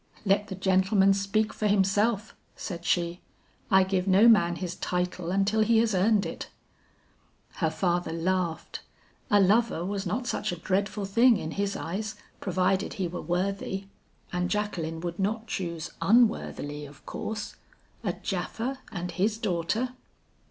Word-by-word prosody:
'Let 205 +1 +2
the 190 - -5
gentleman 190 +1 +3
speak 200 +2 0
for 215 - -1
himself,' 205 +2 +2 0.2
said 175 -3 -6
she, 175 0 0 0.5
'I 190 0 +6
give 185 0 -1
no 195 +4 +6
man 175 -7 +5
his 175 0 -4
title 180 -1 -2
until 195 +3 +1
he 225 +1 +4
has 225 -1 +3
earned 200 +1 +3
it.' 165 - -6 1.1
"Her 160 - +1
father 175 +1 0
laughed. 170 0 -1 0.5
A 205 -3 +5
lover 200 -2 +3
was 195 0 -3
not 240 +8 -2
such 240 - -1
a - - -3
dreadful 200 +3 -1
thing 230 +4 +5
in 160 - -5
his 200 +2 -1
eyes 210 +6 -4 0.2
provided 185 +1 0
he 190 -3 -2
were 175 +1 -5
worthy. 195 +2 -2 0.5
And 180 0 0
Jacqueline 170 -6 -2
would 175 +1 -4
not 220 +3 -1
choose 170 -7 -4
unworthily 190 -8 +2
of 145 0 -17
course 215 -1 -5 0.5
a - - 0
Japha 260 +4 -3
and 180 -1 -4
his 210 +4 0
daughter! 215 +4 -1
195 Hz, 145 wpm, -28 LUFS, 175-210 Hz, 1.1 s, I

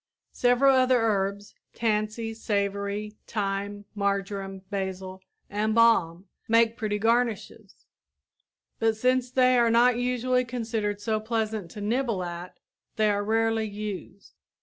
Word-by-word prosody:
Several 250 +2 +4
other 255 -1 +4
herbs 200 -2 -1 0.2
tansy, 220 0 -1
savory, 205 0 -2
thyme, 205 0 -3
marjoram, 195 -1 -2
basil, 190 -1 -4 0.3
and 215 +2 -1
balm 195 -7 +3 0.2
make 230 0 +4
pretty 215 -2 -2
garnishes, 225 -2 -1 0.9
but 225 -1 +1
since 255 +2 +1
they 255 -1 +4
are 235 -1 +4
not 240 +1 +4
usually 250 0 +1
considered 225 -4 -3
so 215 +1 -1
pleasant 220 -4 -2
to 210 - -9
nibble 225 -2 0
at, 175 +1 -7 0.4
they 215 -2 +3
are 205 0 -1
rarely 225 +1 +1
used. 205 -2 -7
215 Hz, 120 wpm, -26 LUFS, 200-230 Hz, 0.9 s, Several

